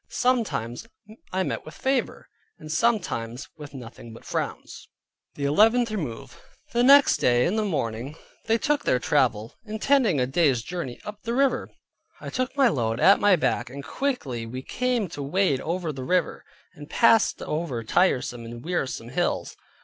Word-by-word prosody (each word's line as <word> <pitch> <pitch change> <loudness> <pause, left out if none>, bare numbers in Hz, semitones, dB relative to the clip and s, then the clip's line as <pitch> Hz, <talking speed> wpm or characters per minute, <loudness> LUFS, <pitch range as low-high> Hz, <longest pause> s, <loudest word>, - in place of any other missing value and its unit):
Sometimes 225 - -1 0.4
I 190 +1 0
met - - -3
with 155 - -11
favor, 265 -1 -1 0.3
and 155 - -9
sometimes 155 - -1
with 145 -3 -10
nothing 115 -2 -10
but - - -14
frowns. - - -5 0.5
THE 140 - -3
ELEVENTH 225 +10 +4
REMOVE 150 - -6 0.3
The 240 - +2
next 280 +3 +7
day 120 0 +3
in 185 - 0
the 220 - +1
morning 130 - -3 0.3
they 225 0 +3
took 295 +3 0
their - - +2
travel, 120 -5 +1
intending 220 - +2
a 125 - +2
day's 135 -3 +2
journey 165 -5 -5
up 210 0 -8
the 235 +1 -3
river. 275 0 +1 0.5
I - - -7
took 255 +2 -2
my 270 -2 +5
load 115 - -1
at 195 - +6
my 205 -2 +5
back, 120 -7 -1
and 140 +2 -8
quickly 140 - -3
we 130 +3 -6
came 250 - -1
to 150 -3 -7
wade 145 -1 +1
over 170 -1 -2
the 130 -1 -6
river; 180 +5 0 0.3
and 145 0 -12
passed 225 -2 +4
over 150 -7 -3
tiresome 125 -3 +1
and 115 +3 -9
wearisome 135 -9 -3
hills. 175 +7 -1
160 Hz, 165 wpm, -25 LUFS, -, 0.5 s, next